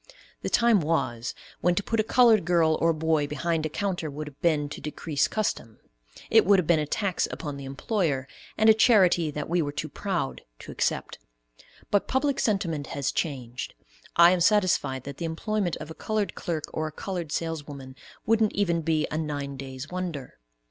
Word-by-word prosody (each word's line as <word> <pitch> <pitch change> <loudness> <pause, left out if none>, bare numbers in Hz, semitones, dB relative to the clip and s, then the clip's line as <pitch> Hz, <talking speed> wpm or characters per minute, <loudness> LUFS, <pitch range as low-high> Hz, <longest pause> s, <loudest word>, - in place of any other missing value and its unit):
The - - -2
time 235 -3 +4
was 130 -8 -1 0.2
when 175 0 +2
to 205 - 0
put 225 +2 -1
a - - +4
colored 230 -2 +5
girl 165 -2 +3
or 165 - +4
boy 160 -2 +1
behind 155 +2 -1
a - - -9
counter 180 -2 -2
would 150 +2 -6
have 145 -2 -12
been 155 -4 +2
to 150 - -8
decrease 150 0 -1
custom; 160 - -2 0.5
it - - +7
would 200 +3 +5
have 185 - +1
been 165 0 +4
a 150 - -2
tax 195 +2 0
upon 145 -2 -5
the 140 -1 -8
employer, 140 - -1 0.3
and 220 - +4
a 220 - +9
charity 190 -8 +4
that 150 0 -4
we 175 +1 +1
were 145 -2 -2
too 150 +2 -4
proud 185 -3 -3 0.2
to - - -10
accept; - - -2 0.7
but 205 - +2
public 270 +1 +1
sentiment 170 -9 0
has 140 -2 -2
changed. 125 -6 -4 0.4
I 170 +1 +8
am 180 -1 +1
satisfied 180 - +2
that 140 0 -8
the 170 - -4
employment 180 +2 -1
of 155 - -8
a - - -5
colored 215 +3 -2
clerk 165 -5 -3
or 155 0 -1
a - - -6
colored 175 -1 -5
saleswoman 145 -5 -4 0.3
wouldn't 220 -1 +3
even 170 -5 +1
be 155 -1 +1
a 155 - -1
"nine 145 -3 -3
days' 130 +1 -7
wonder." 170 - -5
165 Hz, 190 wpm, -26 LUFS, 145-195 Hz, 0.7 s, a